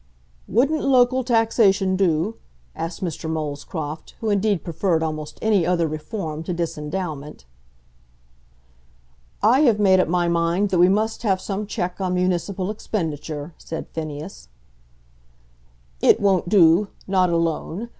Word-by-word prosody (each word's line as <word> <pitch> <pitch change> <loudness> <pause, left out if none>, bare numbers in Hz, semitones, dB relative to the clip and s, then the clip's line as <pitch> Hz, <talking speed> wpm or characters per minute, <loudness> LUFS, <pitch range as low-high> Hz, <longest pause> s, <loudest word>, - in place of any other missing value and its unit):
"Wouldn't 280 - +2
local 255 -1 +3
taxation 225 -5 +3
do?" 185 +2 +1 0.4
asked 165 +3 -5
Mr. 165 -2 -4
Molescroft, 155 0 -5
who 220 -2 -1
indeed 205 -2 +1
preferred 170 -1 0
almost 155 -1 -4
any 210 -5 +3
other 170 -1 +1
reform 155 +1 -5
to 180 - -3
disendowment. 155 - -4 2.0
"I 235 +5 +5
have 240 -8 +4
made 190 -2 +5
up 185 - +2
my 175 +1 +1
mind 170 +4 +1
that 180 - +2
we 180 +1 +6
must 215 +3 0
have 195 -5 +1
some 200 +2 -4
check 180 -1 -3
on 185 -1 0
municipal 185 +2 -1
expenditure," 160 -7 -4
said 160 - -7
Phineas. 155 - -7 1.5
"It - - +5
won't 190 -3 +2
do 175 0 +5 0.2
not 185 -2 +2
alone. 170 +5 -2
180 Hz, 125 wpm, -22 LUFS, 160-205 Hz, 2.0 s, we